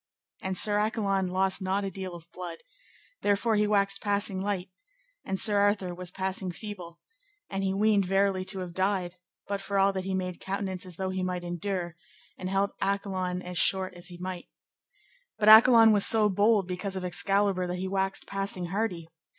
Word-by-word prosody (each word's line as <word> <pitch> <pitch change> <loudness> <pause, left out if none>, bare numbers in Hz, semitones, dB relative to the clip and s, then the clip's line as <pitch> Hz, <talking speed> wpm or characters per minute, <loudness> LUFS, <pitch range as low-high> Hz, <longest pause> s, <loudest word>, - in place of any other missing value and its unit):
And 190 -1 -3
Sir 205 +1 +3
Accolon 200 -3 0
lost 190 +2 0
not 190 +2 -1
a 195 - -3
deal 190 -2 -6
of 170 0 -14
blood, 180 -1 -7 0.6
therefore 205 +3 +1
he 210 0 +2
waxed 200 -1 +1
passing 200 -2 -1
light, 195 -2 -3 0.5
and 190 0 -3
Sir 205 -2 +3
Arthur 200 -3 +1
was 180 0 -5
passing 190 0 -3
feeble, 175 -4 -9 0.5
and 195 0 -2 0.2
weened 210 -2 +3
verily 195 0 +1
to 190 -1 0
have 180 -2 -6
died; 185 -1 -1 0.3
but 200 -1 -3
for 200 0 -3
all 195 0 +3
that 190 -1 -3
he 190 0 -2
made 180 -1 -3
countenance 190 -1 -4
as 180 - -8
though 190 +2 -3
he 185 0 -3
might 180 -1 -3
endure, 175 0 -4 0.4
and 185 - -5
held 195 +1 +1
Accolon 190 -2 -2
as 180 -1 -4
short 190 -1 +3
as 175 0 -9
he 175 -1 -10
might. 180 0 -6 0.9
But 210 - +4
Accolon 225 0 +9
was 205 -2 +4
so 215 -2 +5
bold 205 0 +2
because 185 +2 -4
of 185 -1 -4
Excalibur 195 +1 +1
that 180 0 -3
he 190 +1 -3
waxed 195 0 -1
passing 195 -2 -3
hardy. 190 -6 -2
190 Hz, 185 wpm, -28 LUFS, 185-200 Hz, 0.9 s, Accolon